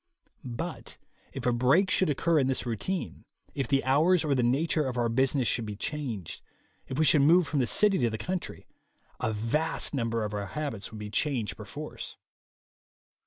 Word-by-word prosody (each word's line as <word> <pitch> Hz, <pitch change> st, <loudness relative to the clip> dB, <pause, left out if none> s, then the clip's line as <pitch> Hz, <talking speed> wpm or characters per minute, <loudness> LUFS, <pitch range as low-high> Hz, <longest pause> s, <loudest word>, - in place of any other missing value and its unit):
But 140 Hz, +7 st, -6 dB, 0.3 s
if -, -, -6 dB
a 125 Hz, -, +3 dB
break 140 Hz, +11 st, +3 dB
should 185 Hz, -, +3 dB
occur 160 Hz, +3 st, +2 dB
in 130 Hz, -, +2 dB
this 135 Hz, -1 st, 0 dB
routine, 125 Hz, -, -3 dB, 0.3 s
if 135 Hz, -2 st, -2 dB
the 135 Hz, -1 st, +2 dB
hours 155 Hz, +6 st, +3 dB
or 145 Hz, -, +2 dB
the 130 Hz, -, +2 dB
nature 145 Hz, +5 st, +1 dB
of 125 Hz, -1 st, -3 dB
our 120 Hz, -1 st, +1 dB
business 130 Hz, +1 st, +2 dB
should 115 Hz, 0 st, 0 dB
be 105 Hz, -, -5 dB
changed, 120 Hz, -, -4 dB, 0.5 s
if 130 Hz, -, -5 dB
we 155 Hz, -, +3 dB
should 150 Hz, -1 st, +5 dB
move 165 Hz, +3 st, +5 dB
from 150 Hz, -, 0 dB
the 125 Hz, -, +2 dB
city 205 Hz, -2 st, +4 dB
to 120 Hz, -3 st, +2 dB
the 110 Hz, -, -4 dB
country, 180 Hz, -, -5 dB, 0.5 s
a 110 Hz, -, 0 dB
vast 115 Hz, +13 st, -1 dB
number 115 Hz, -4 st, -1 dB
of 105 Hz, 0 st, -4 dB
our 100 Hz, -1 st, -3 dB
habits 115 Hz, -2 st, -4 dB
would 110 Hz, -, -8 dB
be 105 Hz, -1 st, -7 dB
changed 125 Hz, -5 st, -1 dB
perforce. -, -, -8 dB
135 Hz, 185 wpm, -28 LUFS, 115-155 Hz, 0.5 s, should